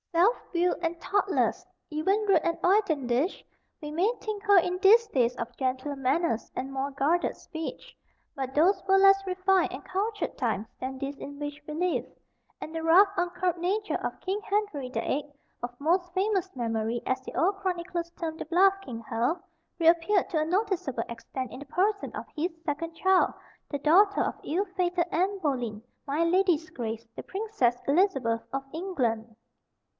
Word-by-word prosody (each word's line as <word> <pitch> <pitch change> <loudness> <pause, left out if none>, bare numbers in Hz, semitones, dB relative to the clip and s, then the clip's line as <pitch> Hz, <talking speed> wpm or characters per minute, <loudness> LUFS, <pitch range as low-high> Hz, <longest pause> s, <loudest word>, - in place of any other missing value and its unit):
Self 365 +8 +4 0.2
willed 355 +1 +1
and 335 0 -2
thoughtless 370 - 0 0.3
even 385 +8 +1
rude 370 -5 +5
and 335 0 0
hoydenish 315 - +1 0.4
we 300 -1 -6
may 360 +8 +2
think 425 -1 -5
her 405 -2 +6
in 360 +1 +2
these 445 +4 +6
days 250 - +1
of 235 - -5
gentler 260 +2 -1
manners 270 -1 0
and 265 +1 -4
more 270 +1 -1
guarded 295 +6 +1
speech. 320 -1 -7 0.4
But 265 -1 -4
those 345 +7 +4
were 385 0 +5
less 390 0 +6
refined 375 0 +2
and - - -8
cultured 410 +1 -2
times 225 -4 -1
than 260 +1 -4
these 275 +1 -4
in 285 +1 -8
which 290 0 -5
we 300 - -5
live; 355 +2 0 0.5
and 315 - -7
the 325 - -3
rough, 350 +5 +7
uncurbed 355 -1 -1
nature 410 +5 -1
of - - -3
"Kinge 395 +3 -2
Henrye 395 -11 -1
the - - -1
viii. 290 +1 -2 0.3
of 245 0 -6
Most 355 +4 +1
Famous 385 -1 +1
Memorye," 230 -1 -1
as 260 0 0
the - - -9
old 390 +4 +2
chronicles 350 -3 -3
term 320 -2 -3
the - - -5
"bluff 380 +3 +5
King 235 -11 -7
Hal," 250 +8 0 0.4
reappeared 340 +5 +4
to 320 - +1
a 305 - +1
noticeable 360 - 0
extent 240 +2 -6
in - - -8
the 285 - -9
person 400 +6 0
of - - -5
his 330 +4 -1
second 330 +2 -3
child, 380 +2 +3 0.4
the 285 - -3
daughter 390 +8 +5
of - - -1
ill 370 +6 0
fated 355 -2 +1
Anne 380 +4 +1
Boleyn 245 - -2 0.3
"my 295 +4 +1
ladye's 340 -2 +2
grace" 230 -1 -5
the - - -6
Princess 385 - 0
Elizabeth 270 - +2
of 270 0 -2
England. 240 - -2
335 Hz, 170 wpm, -28 LUFS, 270-380 Hz, 0.5 s, rough